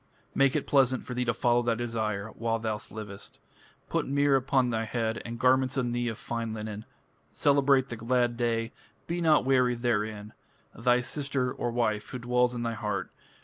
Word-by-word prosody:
(Make) 135 0 +3
it 150 - 0
pleasant 130 -2 +2
for 125 - -5
thee 125 0 -1
to 125 - +1
follow 120 0 +3
thy 120 -1 +1
desire 110 -3 -2
While 115 0 -1
thou 110 -1 -2
livest. 105 -2 -8 0.5
Put - - -1
myrrh 140 0 +3
upon 130 -1 +2
thy 115 0 -1
head, 110 0 -2
And 115 0 -6
garments 130 +1 +3
on 125 -2 0
thee 120 0 -1
of 110 -2 -3
fine 115 -2 -4
linen.... 105 0 -6 0.5
Celebrate 140 -2 +3
the 120 - -5
glad 120 +1 +1
day, 115 -1 -1 0.3
Be 175 +1 -2
not 155 -5 +4
weary 125 -2 +3
therein.... 110 -3 -2 0.4
Thy 125 +1 +2
sister 135 -1 -1
(wife) 115 -3 -1
who 130 - -5
dwells 125 0 +1
in 120 - -3
thy 115 -1 -1
heart. 105 -2 -3
120 Hz, 180 wpm, -28 LUFS, 115-130 Hz, 0.5 s, not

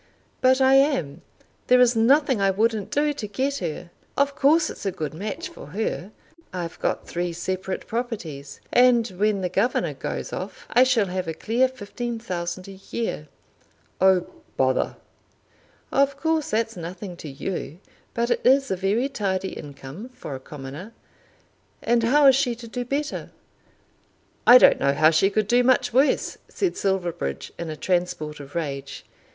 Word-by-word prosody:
"But 260 +1 +4
I 265 0 +5
am. 180 - +1 0.5
There 250 0 +6
is 250 -1 +5
nothing 260 +1 +3
I 195 - +4
wouldn't 215 0 0
do 295 +3 +1
to 245 -7 -5
get 265 +7 -1
her. 170 0 -5 0.3
Of 280 0 +2
course 310 +4 +3
it's - - -10
a 195 - 0
good 155 -4 -5
match 215 - -5
for 345 - -12
her. 200 -2 -3 0.4
I've 175 -2 -5
got - - -2
three 175 0 -2
separate 185 +2 -4
properties; 200 - -5
and 245 -2 +5
when 200 +2 0
the 185 - 0
governor 195 +7 0
goes - - -5
off - - -6
I 250 +2 +6
shall 245 -5 +3
have 185 -1 -3
a 160 - -3
clear 240 +8 +2
fifteen 240 -1 -5
thousand 180 -3 -4
a 195 -1 -11
year." 225 -10 -3 0.7
"Oh, 190 -2 +5 0.3
bother!" 130 0 +1 1.0
"Of 275 0 +2
course 320 -1 0
that's 225 +1 0
nothing 180 +2 -7
to 155 - -8
you, 155 +2 -5 0.4
but 235 +1 0
it - - +1
is 270 0 +4
a - - +2
very 200 +8 0
tidy 195 -7 -2
income 145 - -9
for 250 - -8
a 130 - -5
commoner. 145 +9 -9 0.9
And 235 0 +3
how 290 +5 +4
is 270 -1 +8
she 255 -3 +1
to 230 0 -10
do 245 +2 -4
better?" 280 +4 -3 1.2
"I 245 - +11
don't - - +6
know 140 - +2
how 155 +3 +5
she 165 +5 +3
could 210 0 0
do 245 +3 +4
much 250 -1 +2
worse," 270 +4 +2
said 375 -3 -1
Silverbridge 170 - -2
in 170 -1 -4
a 155 - -4
transport 175 -5 -1
of 140 0 -11
rage. 140 -4 -4
205 Hz, 165 wpm, -24 LUFS, 175-250 Hz, 1.2 s, I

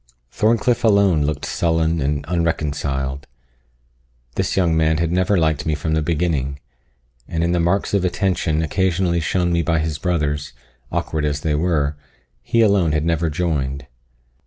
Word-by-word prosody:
Thorncliff 115 - +1
alone 100 -7 +4
looked 75 -1 -2
sullen 80 -1 0
and 70 +1 -1
unreconciled. 70 -5 -2 1.1
This - - -1
young 85 -4 +3
man 80 0 +2
had 85 0 0
never 95 +3 +2
liked 80 -3 0
me 80 - +1
from 80 +1 -2
the 80 - +1
beginning; 75 -4 -1 0.7
and 85 0 -2
in 85 - +1
the 90 - +1
marks 90 +5 0
of 100 -2 +2
attention 90 -4 0
occasionally 90 +1 +1
shown 85 +1 0
me 85 - +2
by 80 +1 +1
his 80 -1 -2
brothers, 75 -4 -1 0.4
awkward 80 -1 -2
as 75 0 -1
they 80 -1 0
were, 75 -2 0 0.4
he 115 - +1
alone 100 -7 +3
had 75 0 0
never 85 0 +1
joined. 70 -5 -2
80 Hz, 155 wpm, -20 LUFS, 75-90 Hz, 1.1 s, alone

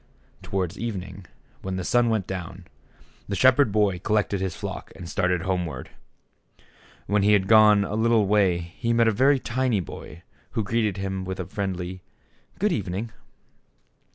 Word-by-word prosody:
Towards 95 -3 -3
evening, 100 -5 -5 0.3
when 95 0 -4
the 95 - -3
sun 120 +4 +2
went 110 -4 0
down, 95 0 -7 0.6
the 100 - -2
shepherd 130 +1 +4
boy 100 -3 +2
col 105 +4 0
lected 100 -2 0
his 95 -3 -2
flock - - -6
and 85 - -9
started 90 0 0
homeward. 90 -8 -3 1.1
When 105 0 +1
he 105 +1 +4
had 95 -2 +3
gone 105 -2 +6
a 100 - -4
little 110 -1 +3
way 100 -3 +3 0.2
he 115 0 0
met 115 0 +4
a - - +4
very 135 +6 +4
tiny 125 -3 0
boy, 85 -1 -9 0.3
who 115 - 0
greeted 105 -2 0
him 95 -1 -3
with 95 0 -5
a 90 - -3
friendly 95 -1 -4 0.6
"Good 210 +2 +1
evening." 105 - -3
100 Hz, 160 wpm, -25 LUFS, 95-110 Hz, 1.1 s, gone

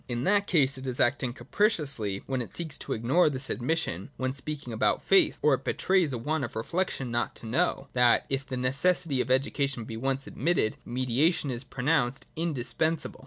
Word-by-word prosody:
In 120 0 -2
that 200 +5 +2
case 140 -6 +3
it 130 - -7
is 125 -1 -3
acting 130 0 +2
capriciously 135 - 0
when 130 -2 -2
it 120 - -6
seeks 160 -5 -3
to - - -4
ignore 135 +10 +3
this 135 -1 -4
admission 125 - -2
when 130 0 -1
speaking 140 -3 -5
about 110 - +1
faith, 195 -1 +4
or 150 -1 +5
it 130 - -1
betrays 185 -6 +1
a 125 - -2
want 150 +5 -2
of 120 - -5
reflection 135 +1 -2
not 120 0 -1
to - - -9
know, 135 +3 0
that, 125 -1 +4
if 135 0 -1
the 130 -1 -5
necessity 140 +3 +1
of - - -3
education 135 -1 +1
be 110 0 -7
once 135 +3 -2
ad - - -11
mitted, 145 -7 +1
mediation 130 +5 +1
is 120 +1 -4
pronounced 135 -1 0
indispensable. 155 0 -2
135 Hz, 190 wpm, -28 LUFS, 120-155 Hz, -, or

